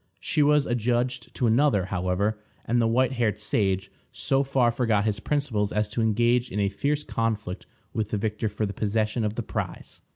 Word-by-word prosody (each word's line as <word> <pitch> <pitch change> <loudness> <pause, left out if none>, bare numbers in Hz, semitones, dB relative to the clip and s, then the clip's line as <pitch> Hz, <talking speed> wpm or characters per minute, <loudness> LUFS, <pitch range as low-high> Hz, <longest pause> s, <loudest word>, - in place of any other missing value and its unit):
She 120 - 0
was 150 0 +4
adjudged 120 +1 -1
to 125 - 0
another, 115 -4 +3
however, 95 +3 -1 0.3
and 120 +1 +2
the 115 - +3
white 125 +3 +2
haired 120 -5 0
sage 95 -2 0 0.2
so 135 0 +2
far 135 -3 +2
forgot 115 -4 +1
his 105 -1 0
principles 115 -7 -1
as 105 0 0
to 115 +2 -2
engage 120 +3 +2
in 105 - -3
a 100 -1 +2
fierce 145 +9 -1
conflict 105 -8 -3 0.3
with 110 -2 -2
the 105 - -1
victor 110 +1 -1
for 105 +1 -2
the 100 - -4
possession 110 +3 0
of 105 0 -1
the 120 - -3
prize. - - -5
110 Hz, 190 wpm, -26 LUFS, 105-125 Hz, 0.3 s, was